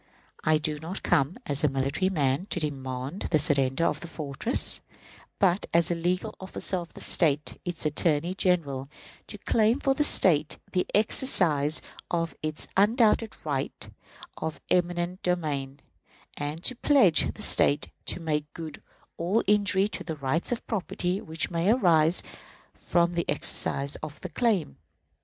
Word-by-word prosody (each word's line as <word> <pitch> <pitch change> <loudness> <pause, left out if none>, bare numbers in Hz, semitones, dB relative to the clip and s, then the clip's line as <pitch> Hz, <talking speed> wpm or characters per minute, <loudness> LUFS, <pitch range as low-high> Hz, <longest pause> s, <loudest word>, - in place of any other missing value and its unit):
I 155 0 +4
do 150 -1 -2
not 165 +5 -6
come 140 - +1
as 145 0 0
a - - +5
military 140 +7 0
man 145 0 0
to 175 - -2
demand 135 +2 -4
the 155 - +3
surrender 140 -1 +1
of 155 - -1
a - - -7
fortress, 155 - +1 0.6
but 190 0 +2
as 170 -1 +4
the - - +1
legal 180 +5 -2
officer 190 0 -3
of 170 -1 -7
the - - -7
State, 150 -3 +1
its 175 -3 -4
Attorney 155 +2 +1
General, 145 -8 0 0.4
to - - -6
claim 225 +3 +2
for 275 -1 +2
the 295 - +1
State 155 - +2
the 180 - 0
exercise 175 - +4 0.3
of 165 -1 -1
its 155 0 -1
undoubted 220 +2 +3
right 140 -3 -3 0.5
of 160 -1 -4
eminent 175 +1 0
domain, 145 -6 -2 0.6
and 150 +3 -5
to 255 - 0
pledge 230 - +4
the - - -3
State 145 +2 +3 0.2
to - - -2
make 150 -3 -2
good 160 -3 -8 0.4
all 185 +7 +1
injury 200 -1 +3
to - - -6
the 160 - -5
rights 145 - -1
of 245 - -3
property 185 -3 -2
which 160 +1 -3
may 170 +3 0
arise 170 -8 +3 0.5
from 170 0 0
the 170 -1 -2
exercise 140 -1 +1
of 155 -1 -8
the - - -6
claim. 205 - 0
165 Hz, 150 wpm, -27 LUFS, 150-185 Hz, 0.6 s, a